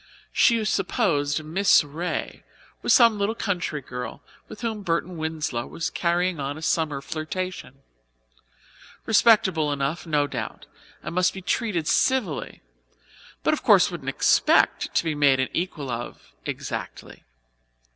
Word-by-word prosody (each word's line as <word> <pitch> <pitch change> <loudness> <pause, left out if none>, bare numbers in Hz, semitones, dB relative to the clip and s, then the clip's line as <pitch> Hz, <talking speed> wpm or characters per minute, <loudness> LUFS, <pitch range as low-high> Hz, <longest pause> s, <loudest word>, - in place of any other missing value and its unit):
She 230 -3 +3
supposed 165 - 0
Miss 175 +5 +4
Ray 160 +5 -4 0.4
was - - 0
some 230 -4 +6
little 205 +3 0
country 175 -9 -2
girl 125 -1 -7 0.2
with 215 - -11
whom 225 -3 -3
Burton 175 -1 -2
Winslow 155 -7 -3
was 165 - -4
carrying 175 -1 0
on 140 +1 -3
a 160 - -9
summer 150 -4 0
flirtation; 155 -2 -5 1.2
respectable 195 -9 +4
enough, 145 +4 -2
no 150 -2 +2
doubt, - - -6 0.4
and - - -5
must 180 +1 +2
be 190 - -6
treated 190 -6 -1
civilly, 225 - 0 0.8
but - - +3
of - - -2
course - - +5
wouldn't - - -5
expect - - +3
to - - +3
be 160 -2 -1
made 140 -3 +3
an 130 - 0
equal 160 -6 -3
of 115 - -7
exactly. - - -6
165 Hz, 135 wpm, -24 LUFS, 145-190 Hz, 1.2 s, some